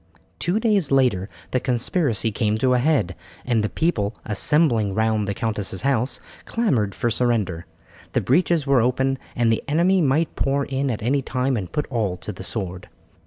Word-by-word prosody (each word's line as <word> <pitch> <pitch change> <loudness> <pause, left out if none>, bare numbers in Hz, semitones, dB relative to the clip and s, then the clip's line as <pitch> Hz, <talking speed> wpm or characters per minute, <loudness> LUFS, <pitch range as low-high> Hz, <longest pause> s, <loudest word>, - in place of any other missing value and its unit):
Two 180 +5 0
days 210 -8 +1
later 125 -8 +2 0.2
the 130 - +2
conspiracy 120 - +1
came 105 0 0
to 125 +3 +2
a 125 - +3
head, 130 - +1 0.3
and 120 -3 +2
the 105 - 0
people, 110 -12 -1
assembling 110 -2 +2
round 110 -1 +1
the 100 - -2
countess's 105 -3 -2
house, 130 -2 0 0.3
clamoured 125 - 0
for 120 - 0
surrender. 110 -8 0 0.5
The - - +2
breaches 165 +2 +2
were 135 -3 +4
open, 130 +2 +1 0.2
and 120 -1 +2
the 115 - 0
enemy 175 +5 +3
might 155 +2 +1
pour 140 0 0
in 135 0 -1
at 110 -4 -3
any 135 +4 +1
time 130 0 -1
and 95 -6 -4
put 150 - -1
all 105 -7 -1
to 100 - -6
the 95 -1 -9
sword. 95 -2 -4
125 Hz, 175 wpm, -23 LUFS, 105-140 Hz, 0.5 s, were